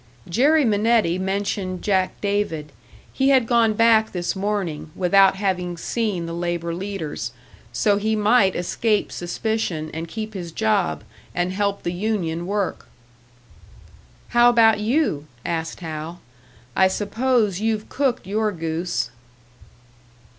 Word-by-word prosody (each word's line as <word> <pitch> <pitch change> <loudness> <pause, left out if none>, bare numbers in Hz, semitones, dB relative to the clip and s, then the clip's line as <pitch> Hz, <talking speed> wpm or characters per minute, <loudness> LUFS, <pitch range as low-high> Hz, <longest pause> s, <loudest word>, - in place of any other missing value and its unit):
Jerry 285 - +3
Minetti 215 -4 +2
mentioned 190 -1 -2
Jack 190 -2 0
David. 200 -8 -1 0.4
He 270 0 +2
had 260 -3 +5
gone 225 -2 +3
back 225 -1 +4
this 175 0 -2
morning, 190 -6 -2
without 190 +1 +4
having 180 -3 -2
seen 205 -2 -2
the 165 - -5
labour 170 0 -2
leaders. 165 - -4 0.4
So 200 - +2
he 220 +2 0
might 210 -2 +3
escape 210 +4 0
suspicion, 175 -4 -2
and 165 +1 -4
keep 215 +3 -6
his 175 -4 -6
job, 210 -1 0 0.3
and 180 +1 0
help 200 0 -1
the 175 - -2
union 175 -4 -2
work. 200 -1 -2 1.4
"How 240 0 +6
about 225 -2 +5
you?" 215 - 0 0.2
asked 165 0 -3
Hal. 160 +1 -6 0.6
"I 190 - +5
suppose 215 0 0
you've 220 0 -1
cooked 260 -6 -1
your 210 +2 0
goose." 165 - -2
195 Hz, 125 wpm, -22 LUFS, 175-220 Hz, 1.4 s, How